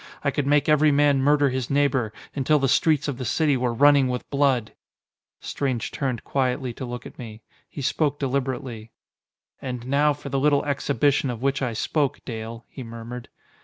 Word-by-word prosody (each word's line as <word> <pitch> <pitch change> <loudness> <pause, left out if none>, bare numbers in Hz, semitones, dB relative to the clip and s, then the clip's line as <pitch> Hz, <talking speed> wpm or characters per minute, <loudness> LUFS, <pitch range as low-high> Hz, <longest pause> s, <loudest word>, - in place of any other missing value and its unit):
I 140 - +1
could 140 -1 -2
make 145 0 +3
every 150 0 +4
man 140 -1 +3
murder 145 0 +3
his 130 -2 -3
neighbor, 140 -5 +1 0.2
until 145 +2 +2
the 135 -1 +1
streets 150 +2 +2
of 140 -3 -3
the - - -3
city 145 +4 +1
were 125 -1 0
running 140 +2 +5
with 125 -1 -3
blood!" 135 -6 +1 0.7
Strange 130 -5 -2
turned 130 -5 -3
quietly 130 -2 -1
to 130 - -6
look 125 0 -7
at - - -12
me. 110 -2 -9 0.3
He 140 - -7
spoke 145 +2 0
deliberately. 130 -4 -3 0.7
"And 125 -2 -5
now 145 +3 +3
for 145 0 -9
the 135 0 0
little 145 0 +2
exhibition 140 -1 +1
of 120 0 -5
which 140 0 0
I 125 -3 -1
spoke, 140 +5 -1
Dale," 115 0 -6
he 135 - -10
murmured. 115 +1 -8
135 Hz, 180 wpm, -24 LUFS, 125-145 Hz, 0.7 s, running